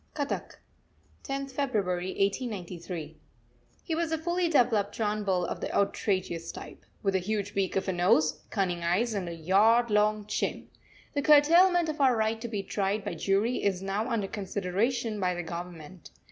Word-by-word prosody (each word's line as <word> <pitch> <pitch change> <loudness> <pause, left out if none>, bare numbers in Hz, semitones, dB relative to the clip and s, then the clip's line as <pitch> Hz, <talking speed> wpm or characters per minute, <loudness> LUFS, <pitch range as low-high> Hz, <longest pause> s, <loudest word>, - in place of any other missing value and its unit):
CUTTACK, 285 -2 -3 0.7
10th 275 0 -4
February 205 -10 -1
1893. 185 - -3 0.6
He 330 - -3
was 330 0 -1
a 320 - +1
fully 345 +2 0
developed 230 -9 +2
John 215 -1 -1
Bull 185 -3 +1
of - - -5
the - - -3
outrageous 185 -4 0
type - - -10 0.2
with 195 -1 +1
a 190 - +2
huge 205 +1 -2
beak 195 -2 -1
of 195 - 0
a 190 - 0
nose, 175 -3 +2
cunning 180 -4 -1
eyes, 200 +8 +1
and 190 -4 -3
a 170 - -6
yard 215 +8 +3
long 210 0 +2
chin. - - -3 0.4
The 285 - 0
curtailment 335 +4 +6
of 310 -2 -3
our 260 -3 +5
right 220 +1 0
to 235 - -4
be 210 -4 -3
tried 200 +1 -1
by - - -3
jury 200 +8 0
is 195 -2 0
now 200 +5 -2
under 220 -5 -1
consideration 210 +4 -2
by 180 -2 0
the 175 - -4
Government. 170 0 -8
205 Hz, 170 wpm, -28 LUFS, 185-240 Hz, 0.7 s, curtailment